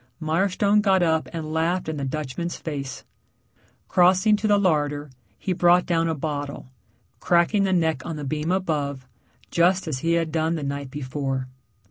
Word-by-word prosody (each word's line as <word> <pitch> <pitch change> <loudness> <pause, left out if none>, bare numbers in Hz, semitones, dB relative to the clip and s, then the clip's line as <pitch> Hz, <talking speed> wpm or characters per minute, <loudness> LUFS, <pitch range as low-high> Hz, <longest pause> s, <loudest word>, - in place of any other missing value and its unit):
Mirestone 195 +6 +2
got 190 -3 +3
up 160 -1 +1
and 155 -2 -5
laughed 170 +3 0
in 160 -1 -3
the 140 - -3
Dutchman's 155 +4 -3
face. 140 -4 -6 0.8
Crossing 185 +4 +4
to 215 +1 -1
the 205 -1 +4
larder, 150 -6 0 0.3
he 185 - -2
brought 175 0 +4
down 165 -1 +1
a 160 - -1
bottle, 145 -3 -5 0.5
cracking 180 +4 +3
the 190 - 0
neck 160 -7 +1
on 165 - -5
the 150 - -6
beam 155 +4 -2
above, 145 -8 -1 0.5
just 180 +2 +2
as 140 -5 -2
he 165 +4 0
had 165 -2 0
done 160 +1 0
the 155 - -4
night 140 -1 -4
before. 135 -1 -3
160 Hz, 165 wpm, -24 LUFS, 145-180 Hz, 0.8 s, Crossing